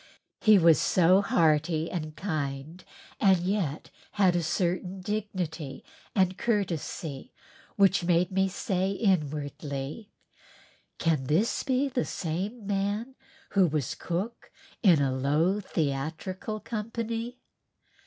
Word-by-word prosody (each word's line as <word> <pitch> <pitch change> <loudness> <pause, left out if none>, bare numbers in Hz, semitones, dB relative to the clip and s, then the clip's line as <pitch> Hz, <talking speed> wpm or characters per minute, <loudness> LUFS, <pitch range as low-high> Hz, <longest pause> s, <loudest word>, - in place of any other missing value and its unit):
He 215 -1 +6
was 165 -3 +5
so 185 +2 +4
hearty 160 -3 +2
and 155 -3 -4
kind 155 -1 -4 0.4
and 190 -2 +5
yet 175 -4 -2 0.2
had 190 -3 +3
a 175 - +2
certain 180 +3 -1
dignity 180 -8 -4 0.3
and 185 -2 +2
courtesy 175 - -2 0.4
which 195 -2 +4
made 175 +1 +2
me 190 0 +2
say 190 -1 -1
inwardly, 150 - -2 0.9
"Can 155 -5 +1
this 170 - +1
be 265 +1 +1
the 255 -2 -1
same 195 +7 -4
man 205 +5 -1 0.4
who 190 -3 +4
was 150 -5 -1
cook 195 +7 -4 0.3
in 170 -9 +5
a 135 -1 +1
low 150 +9 +2
theatrical 165 - -3
company?" 230 +2 -4
180 Hz, 110 wpm, -28 LUFS, 155-205 Hz, 0.9 s, He